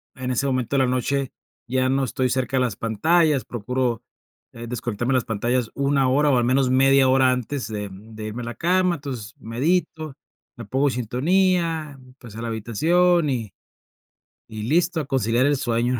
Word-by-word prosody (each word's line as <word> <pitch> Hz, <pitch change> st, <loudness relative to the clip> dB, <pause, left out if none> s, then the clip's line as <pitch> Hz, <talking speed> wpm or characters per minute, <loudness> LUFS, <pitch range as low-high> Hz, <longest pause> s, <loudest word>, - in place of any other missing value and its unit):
en 130 Hz, -1 st, -4 dB
ese 130 Hz, +3 st, 0 dB
momento 130 Hz, -1 st, -1 dB
de -, -, +3 dB
la -, -, +1 dB
noche 130 Hz, +1 st, -1 dB, 0.4 s
ya 130 Hz, +1 st, +1 dB
no 135 Hz, +1 st, +1 dB
estoy 130 Hz, 0 st, -1 dB
cerca 130 Hz, +1 st, -1 dB
de -, -, +3 dB
las 125 Hz, -3 st, -1 dB
pantallas, 150 Hz, +6 st, +2 dB
procuro, 120 Hz, +1 st, -2 dB, 0.5 s
eh, 115 Hz, 0 st, -9 dB
desconectarme 120 Hz, 0 st, -3 dB
de -, -, +3 dB
las 125 Hz, -, -1 dB
pantallas 120 Hz, +2 st, -1 dB
una 140 Hz, -1 st, +1 dB
hora, 145 Hz, +3 st, +3 dB
o 130 Hz, -, +3 dB
al 120 Hz, -, +2 dB
menos 130 Hz, +1 st, +2 dB
media 135 Hz, +1 st, +5 dB
hora 130 Hz, 0 st, +4 dB
antes 125 Hz, -1 st, -3 dB
de, 105 Hz, -2 st, -5 dB
mm, 105 Hz, +4 st, -13 dB
de 110 Hz, -, -7 dB
irme 110 Hz, +3 st, -5 dB
a -, -, -6 dB
la 120 Hz, 0 st, -6 dB
cama, 180 Hz, +1 st, +2 dB
entonces 130 Hz, -8 st, -7 dB
medito, 155 Hz, +5 st, -2 dB, 0.4 s
me 120 Hz, -, -9 dB
pongo 135 Hz, +7 st, +1 dB
en 135 Hz, -, 0 dB
sintonía, 160 Hz, -, 0 dB, 0.2 s
pues 120 Hz, -6 st, -13 dB
a 115 Hz, -, -6 dB
la 115 Hz, -, -4 dB
habitación, 160 Hz, -, +2 dB
y 115 Hz, -6 st, -3 dB, 1.0 s
y 110 Hz, -1 st, -6 dB
listo 165 Hz, +7 st, +1 dB
a 150 Hz, -, -3 dB
conciliar 125 Hz, -2 st, +1 dB
el 145 Hz, 0 st, +2 dB
sueño. 120 Hz, -1 st, 0 dB
130 Hz, 190 wpm, -23 LUFS, 115-140 Hz, 1.0 s, media